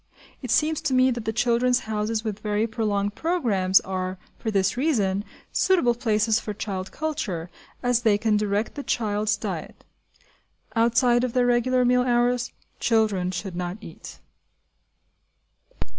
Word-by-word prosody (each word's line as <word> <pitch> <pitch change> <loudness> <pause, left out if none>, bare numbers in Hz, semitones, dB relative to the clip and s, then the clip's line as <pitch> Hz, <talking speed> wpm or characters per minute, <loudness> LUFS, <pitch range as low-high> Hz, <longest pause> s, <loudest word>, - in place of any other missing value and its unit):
It 255 - -6
seems 310 +5 +2
to 280 -4 0
me 255 0 +4
that 235 -2 -4
the 220 - 0
"Children's 245 +2 +2
Houses" 215 0 -2
with 215 -2 -4
very 210 +1 0
prolonged 210 -3 -1
programmes 210 - +2
are, 185 0 -4 0.2
for 225 - -3
this 195 -3 +1
reason, 210 -9 +1 0.3
suitable 340 -11 +3
places 225 -2 +1
for 210 -2 -6
child 190 -2 -4
culture, 230 - -3 0.3
as 245 -1 +2
they 220 -3 +3
can 220 0 +1
direct 210 +1 0
the 285 - -5
child's 215 -4 0
diet. - - -6 0.9
Outside 240 +1 +3
of 250 -2 -1
their 250 -1 +3
regular 250 +1 +2
meal 250 0 +4
hours, 245 0 +1 0.3
children 215 -6 +1
should 185 0 -5
not 180 +2 -3
eat. - - -11
225 Hz, 145 wpm, -25 LUFS, 205-245 Hz, 0.9 s, me